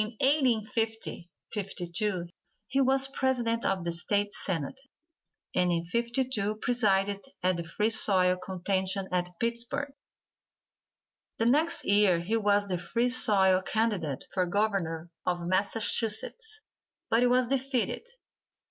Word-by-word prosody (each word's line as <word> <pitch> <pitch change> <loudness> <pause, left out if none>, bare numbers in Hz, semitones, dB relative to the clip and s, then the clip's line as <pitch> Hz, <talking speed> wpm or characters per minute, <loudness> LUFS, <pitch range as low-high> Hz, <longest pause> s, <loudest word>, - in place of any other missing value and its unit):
In 215 +2 -4
1850 225 - +1 0.3
52 190 -2 -2 0.4
he 270 +5 0
was 270 0 +3
president 245 -4 -1
of 190 -2 0
the 170 - -2
State 205 +4 0
Senate, 180 - -2 0.7
and 180 -1 +2
in 170 -1 0
'52 235 0 -1
presided 205 -4 0 0.2
at 185 -1 +2
the 170 - -3
Free 210 +7 -1
Soil 185 -4 +3
contention 190 +1 -2
at 180 -1 0
Pittsburgh. 240 +5 -2 1.4
The 225 - 0
next 305 +7 +2
year 200 -3 +4
he 185 +7 -2
was 205 -2 +2
the 185 -3 -3
Free 230 +8 0
Soil 190 -6 +4
candidate 190 - -1
for 185 -2 0
Governor 175 -4 -1
of 175 -1 -2
Massachusetts, 225 - +1 0.5
but 245 +2 +4
was 250 0 +3
defeated. 265 - -1
210 Hz, 120 wpm, -28 LUFS, 185-240 Hz, 1.4 s, year